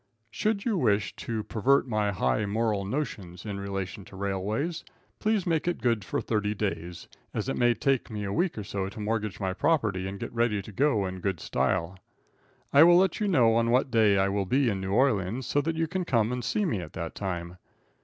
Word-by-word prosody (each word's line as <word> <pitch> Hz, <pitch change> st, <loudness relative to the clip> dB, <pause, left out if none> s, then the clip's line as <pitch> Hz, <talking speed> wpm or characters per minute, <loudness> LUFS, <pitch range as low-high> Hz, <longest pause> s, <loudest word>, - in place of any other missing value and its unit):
Should 210 Hz, -, -1 dB
you 220 Hz, -6 st, +1 dB
wish 105 Hz, -6 st, +1 dB
to 110 Hz, -2 st, -3 dB
pervert 130 Hz, +7 st, +2 dB
my 105 Hz, -3 st, 0 dB
high 100 Hz, +2 st, 0 dB
moral 105 Hz, -1 st, 0 dB
notions 100 Hz, -, -4 dB
in 100 Hz, -2 st, -4 dB
relation 100 Hz, 0 st, -4 dB
to -, -, -13 dB
railways, 100 Hz, -, -2 dB, 0.4 s
please 215 Hz, -3 st, +1 dB
make 165 Hz, -1 st, 0 dB
it 175 Hz, -, 0 dB
good 115 Hz, -4 st, +1 dB
for -, -, -2 dB
thirty 105 Hz, -1 st, -1 dB
days, 85 Hz, -4 st, -4 dB, 0.3 s
as -, -, -2 dB
it -, -, -1 dB
may 120 Hz, -1 st, +3 dB
take 135 Hz, 0 st, 0 dB
me 105 Hz, -2 st, -4 dB
a 100 Hz, 0 st, -3 dB
week 175 Hz, -3 st, 0 dB
or 105 Hz, -, -3 dB
so 100 Hz, -1 st, -3 dB
to 105 Hz, -, -10 dB
mortgage 105 Hz, -2 st, -2 dB
my 95 Hz, -2 st, -1 dB
property 105 Hz, -, +1 dB
and 100 Hz, +1 st, -6 dB
get -, -, -6 dB
ready 115 Hz, -3 st, +1 dB
to 110 Hz, -, -10 dB
go 115 Hz, -3 st, +2 dB
in 95 Hz, 0 st, -5 dB
good 95 Hz, -2 st, -2 dB
style. 85 Hz, +3 st, -1 dB, 0.7 s
I 140 Hz, -, +8 dB
will 175 Hz, +2 st, +8 dB
let 190 Hz, -1 st, +2 dB
you 210 Hz, -, 0 dB
know 125 Hz, -, +4 dB
on 115 Hz, 0 st, +2 dB
what 125 Hz, +2 st, +2 dB
day 110 Hz, -4 st, +4 dB
I 95 Hz, 0 st, +3 dB
will 100 Hz, -1 st, -1 dB
be 130 Hz, +3 st, +3 dB
in 95 Hz, -3 st, -2 dB
New 95 Hz, 0 st, -3 dB
Orleans, 115 Hz, -1 st, +1 dB
so 145 Hz, -, +1 dB
that 165 Hz, +3 st, -2 dB
you 165 Hz, 0 st, +1 dB
can 180 Hz, +3 st, -2 dB
come 115 Hz, -8 st, +1 dB
and 125 Hz, -1 st, -3 dB
see 210 Hz, -, 0 dB
me 115 Hz, -, 0 dB
at 85 Hz, -3 st, -8 dB
that 85 Hz, -1 st, -5 dB
time. 90 Hz, -2 st, -4 dB
110 Hz, 220 wpm, -28 LUFS, 95-135 Hz, 0.7 s, I